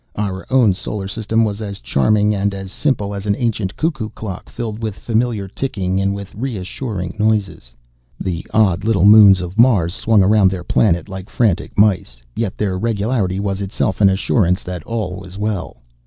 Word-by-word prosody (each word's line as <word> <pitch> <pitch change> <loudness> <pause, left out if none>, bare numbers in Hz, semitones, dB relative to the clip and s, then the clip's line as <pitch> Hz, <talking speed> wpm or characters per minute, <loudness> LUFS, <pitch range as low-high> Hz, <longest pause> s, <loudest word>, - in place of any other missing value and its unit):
Our 95 -2 -4
own 125 -6 +4
solar 100 +1 -5
system 110 +2 0
was 105 0 -4
as 100 -2 -5
charming 105 - +2
and 100 0 -1
as 95 -1 -7
simple 105 -6 -1
as 100 +1 -6
an 100 - +2
ancient 110 -6 -2
cuckoo 150 -9 -2
clock 100 -5 -8
filled 115 -2 -5
with 110 -3 -3
familiar 115 -3 -1
ticking 95 -4 -2
and 100 0 0
with 100 -1 -8
reassuring 105 -4 -4
noises. 105 - -1 0.4
The 90 -2 -3
odd 100 -4 +2
little 105 -4 +2
moons 100 -3 +8
of 90 +4 -6
Mars 100 -9 +4
swung 110 -2 +3
around 100 0 +4
their 90 -2 -5
planet 85 -2 +1
like 95 -1 -8
frantic 105 -8 0
mice, 95 - +2 0.2
yet 110 -4 -3
their 95 -3 -1
regularity 105 -3 -1
was 100 -1 -2
itself 100 +1 -2
an 100 - +7
assurance 95 -1 +1
that 90 -1 -6
all 105 -6 -3
was 95 0 -10
well. 105 -3 -3
100 Hz, 175 wpm, -18 LUFS, 95-110 Hz, 0.4 s, moons